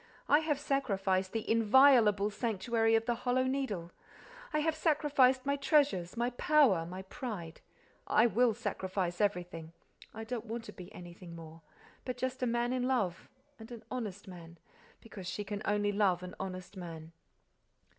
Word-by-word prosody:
I 295 - +6
have 310 -3 -1
sacrificed 195 -10 0
the 225 -1 -3
inviolable 225 -3 +5
sanctuary 225 +1 +1
of 225 0 +1
the 240 - +1
Hollow 250 +2 0
Needle, 260 -11 -2 0.6
I 305 - +1
have 320 +1 +1
sacrificed 285 -5 +3
my 280 0 +1
treasures, 275 - +1
my 240 +1 0
power, 245 - +3
my 185 +2 -7
pride—I 210 - -3
will 240 -1 +3
sacrifice 185 -2 -3
everything—I 180 +2 -5
don't 235 0 -5
want 230 +1 -4
to 210 - -10
be 180 -2 -11
anything 175 -1 -11
more—but 165 +9 -11
just 260 +1 -3
a 250 - +1
man 240 +1 0
in 250 -1 0
love—and 255 +3 -4
an 230 -2 -9
honest 210 -6 -5
man, 170 -2 -11 0.4
because 195 -5 -10
she 205 +3 -3
can 205 +1 -5
only 205 0 +1
love 195 -3 +1
an 180 - -7
honest 185 +1 -6
man. 165 -3 -8
220 Hz, 145 wpm, -32 LUFS, 185-255 Hz, 0.6 s, I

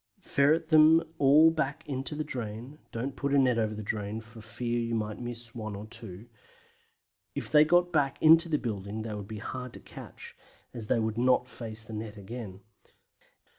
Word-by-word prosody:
Ferret 155 +3 +2
them 160 +1 +6 0.2
all 150 +4 +6
back 155 -1 -3
into 135 0 -3
the 155 - -2
drain; 125 +1 -6
don't 130 +4 -4
put 140 0 -1
a - - +5
net 125 -3 +3
over 110 -1 -1
the 110 - -6
drain 105 +1 -3
for 115 0 -13
fear 120 +2 -3
you 115 0 -2
might 105 -1 -3
miss 120 -1 -7
one 110 -3 -6
or 100 +2 -7
two. 110 -2 -9 1.1
If - - -5
they 150 -1 +7
got 175 +2 +3
back 145 -4 +1
into 165 +2 +7
the 150 - +2
building 105 -3 -4
they 110 -1 -5
would 105 -1 -6
be 110 - -7
hard 125 +3 -6
to - - -9
catch, - - -12 0.4
as 115 -3 -7
they - - +2
would 110 0 -1
not 125 0 +3
face 115 -3 -7
the 110 - -10
net 110 0 -6
again. 100 -1 -8
120 Hz, 190 wpm, -29 LUFS, 110-140 Hz, 1.1 s, they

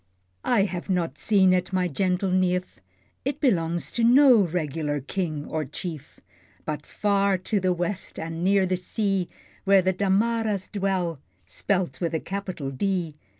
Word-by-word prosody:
I 230 -5 +3
have 185 -1 -4
not 180 -3 -1
seen 190 -4 +4
it, 180 0 0
my 185 -1 +1
gentle 185 +3 0
neef, 180 - 0 0.4
It 280 +2 -2
belongs 170 - 0
to 235 - -1
no 255 +1 +7
regular 155 -5 -1
King 155 0 -3
or 155 -1 -2
Chief; 150 +1 -7 0.5
But 150 -1 -4
far 200 -2 +1
to 200 +3 -1
the 185 -1 +1
west, 180 +2 -3
and 165 +1 -4
near 195 0 +3
the 185 0 0
sea, 195 0 -1 0.4
Where 195 -1 +5
the 190 +1 +2
Damaras' 205 +1 0
dwell 190 -6 -1 0.3
(spelt 170 - -2
with 165 -2 -2
capital 185 -8 -4
"D.") 175 +2 -1
185 Hz, 150 wpm, -25 LUFS, 165-200 Hz, 0.5 s, no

